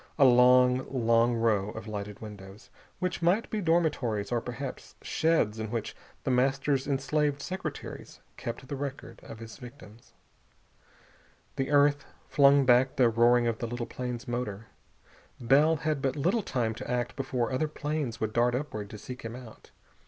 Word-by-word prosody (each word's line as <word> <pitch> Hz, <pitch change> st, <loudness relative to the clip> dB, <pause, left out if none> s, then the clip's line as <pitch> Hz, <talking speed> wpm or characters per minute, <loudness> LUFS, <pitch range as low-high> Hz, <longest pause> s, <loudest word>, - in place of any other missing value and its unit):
A 140 Hz, -, +6 dB
long, 125 Hz, 0 st, +5 dB
long 115 Hz, -2 st, +2 dB
row 110 Hz, -3 st, +1 dB
of 110 Hz, 0 st, -8 dB
lighted 105 Hz, -1 st, -6 dB
windows, 100 Hz, -1 st, -11 dB, 0.3 s
which 180 Hz, 0 st, -2 dB
might 180 Hz, +7 st, +1 dB
be 215 Hz, -, -1 dB
dormitories 145 Hz, -, 0 dB
or 120 Hz, -1 st, +1 dB
perhaps 125 Hz, +3 st, -7 dB
sheds 155 Hz, -10 st, +1 dB
in 110 Hz, -1 st, -4 dB
which 115 Hz, -1 st, -4 dB, 0.3 s
The -, -, 0 dB
Master's 135 Hz, +2 st, +1 dB
enslaved 145 Hz, +1 st, 0 dB
secretaries 185 Hz, +6 st, -6 dB, 0.2 s
kept 120 Hz, +3 st, -6 dB
the 140 Hz, -, -4 dB
record 140 Hz, 0 st, -6 dB
of 115 Hz, -, -10 dB
his 115 Hz, -1 st, -10 dB
victims. 120 Hz, -3 st, -14 dB, 1.4 s
The 135 Hz, -, -2 dB
earth 145 Hz, -1 st, +4 dB, 0.2 s
flung 140 Hz, -1 st, +5 dB
back 125 Hz, +1 st, +4 dB
the 125 Hz, -3 st, +4 dB
roaring 120 Hz, +1 st, +4 dB
of 115 Hz, -1 st, -1 dB
the 120 Hz, -, -3 dB
little 120 Hz, 0 st, -4 dB
plane's 125 Hz, -1 st, -5 dB
motor. 115 Hz, -3 st, -4 dB, 0.7 s
Bell 145 Hz, +7 st, +4 dB
had 155 Hz, -1 st, -2 dB
but 135 Hz, -1 st, 0 dB
little 180 Hz, +10 st, +1 dB
time 120 Hz, -, -1 dB
to 110 Hz, -, -8 dB
act 120 Hz, -1 st, -1 dB
before 130 Hz, -3 st, -2 dB
other 130 Hz, +4 st, 0 dB
planes 150 Hz, -5 st, -3 dB
would 110 Hz, 0 st, -2 dB
dart 120 Hz, +1 st, +2 dB
upward 110 Hz, -7 st, -4 dB
to 105 Hz, -, -8 dB
seek 125 Hz, +4 st, -9 dB
him 115 Hz, +1 st, -6 dB
out. 125 Hz, -3 st, -12 dB
125 Hz, 160 wpm, -29 LUFS, 115-140 Hz, 1.4 s, A